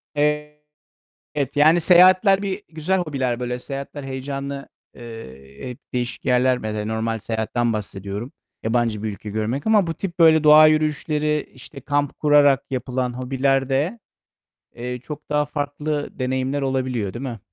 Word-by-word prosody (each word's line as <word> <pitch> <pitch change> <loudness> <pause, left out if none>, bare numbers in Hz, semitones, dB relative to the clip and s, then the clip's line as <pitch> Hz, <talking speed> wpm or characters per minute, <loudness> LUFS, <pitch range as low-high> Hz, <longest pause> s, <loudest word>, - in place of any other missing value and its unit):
Evet, 150 0 -2 0.7
yani 155 +4 +5
seyahatler 185 +3 +6
bir 200 0 -3
güzel 165 +4 -1
hobiler. 135 -8 -2
Böyle 125 0 -3
seyahatler 140 +1 -7
heyecanlı, 140 +1 -5 0.3
eee, 70 - -10
hep 125 - -9
değişik 125 -1 -3
yerler. 125 0 +3
Mesela 110 -2 -4
normal 110 +1 -2
seyahatten 110 +2 -1
bahsediyorum. 100 +3 -5 0.3
Yabancı 115 -2 0
bir 110 - -1
ülke 105 +1 -9
görmek. 110 - -2
Ama 210 -5 +4
bu 165 - -2
tip 180 +1 -6
böyle 160 -2 +6
doğa 155 +1 +8
yürüyüşleri, 150 0 0
işte, 135 +2 -12
kamp 145 0 -1
kurarak 145 -2 +4
yapılan 125 -1 -2
hobilerde, 135 - 0 0.8
eee, 125 +1 -5
çok 150 +4 -9
daha 150 0 +1
farklı 145 0 -4
deneyimler 130 +2 -1
olabiliyor, 130 -6 -1
değil 120 +3 -6
mi? 120 -4 -5
135 Hz, 135 wpm, -22 LUFS, 120-150 Hz, 0.8 s, doğa